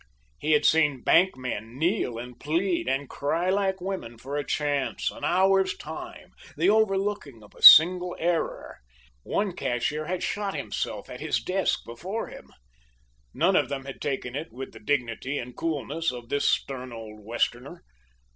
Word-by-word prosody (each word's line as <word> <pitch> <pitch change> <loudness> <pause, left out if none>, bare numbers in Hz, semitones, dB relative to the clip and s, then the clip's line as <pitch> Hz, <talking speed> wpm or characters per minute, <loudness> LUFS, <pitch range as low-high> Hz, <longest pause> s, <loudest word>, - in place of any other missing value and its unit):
He 155 +1 +1
had 150 0 +3
seen 150 -5 +3
bank 185 -3 +4
men 120 -2 -5
kneel 160 - 0
and 120 +1 -9
plead 170 +5 0
and 135 +2 -1
cry 165 +8 -1
like 190 -1 0
women 180 -11 -5
for 135 +5 -6
a 145 - -1
chance 145 -1 -1
an - - -12
hour's 190 +1 +3
time - - -9 0.3
the - - +4
overlooking 195 - 0
of 105 - -17
a - - -17
single 180 +2 +9
error. 170 0 -2 0.4
One 200 - -2
cashier 150 +5 -2
had 185 +1 -2
shot 205 0 -2
himself - - -4
at - - -9
his - - 0
desk 190 0 0
before 180 - -5
him. - - -12 0.9
None - - +3
of - - +2
them 135 -1 -4
had 135 - -9
taken 130 -3 -3
it 150 -3 -5
with 130 +3 -8
the 110 - -13
dignity 130 +2 -1
and 125 -1 -6
coolness 160 +1 -2
of 120 -1 -9
this 145 +1 +1
stern 130 -2 -2
old 110 -2 -9
Westerner. 120 - -2
145 Hz, 165 wpm, -26 LUFS, 125-185 Hz, 0.9 s, single